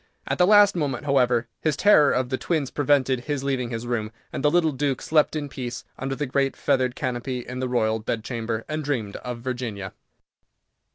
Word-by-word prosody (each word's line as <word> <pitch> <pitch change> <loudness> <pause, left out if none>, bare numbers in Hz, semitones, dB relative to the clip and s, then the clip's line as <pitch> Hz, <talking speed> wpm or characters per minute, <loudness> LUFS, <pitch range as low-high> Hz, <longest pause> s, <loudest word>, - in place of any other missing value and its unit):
At - - -1
the 180 - +5
last 205 -1 +6
moment, 145 -5 -2
however, 125 -4 +2
his 155 -2 0
terror 170 -7 +6
of 125 0 0
the 130 - -1
twins 155 -6 -1
prevented 135 -3 +1
his 145 -2 -2
leaving 130 -3 -1
his 115 0 -4
room, 115 -3 -2 0.2
and - - -4
the 150 - +5
little 160 0 +3
Duke 140 -1 -1
slept 155 0 +2
in 150 -2 -2
peace 125 -3 -6
under 135 +1 -3
the 145 - -2
great 135 +1 0
feathered 130 -1 +1
canopy 125 0 -3
in 125 +1 -5
the 130 -1 -2
Royal 110 -3 +1
Bedchamber, 115 0 -3
and 155 0 -3
dreamed 120 -9 -2
of 125 -1 -6
Virginia. 120 -6 -4
130 Hz, 190 wpm, -24 LUFS, 120-145 Hz, 0.2 s, last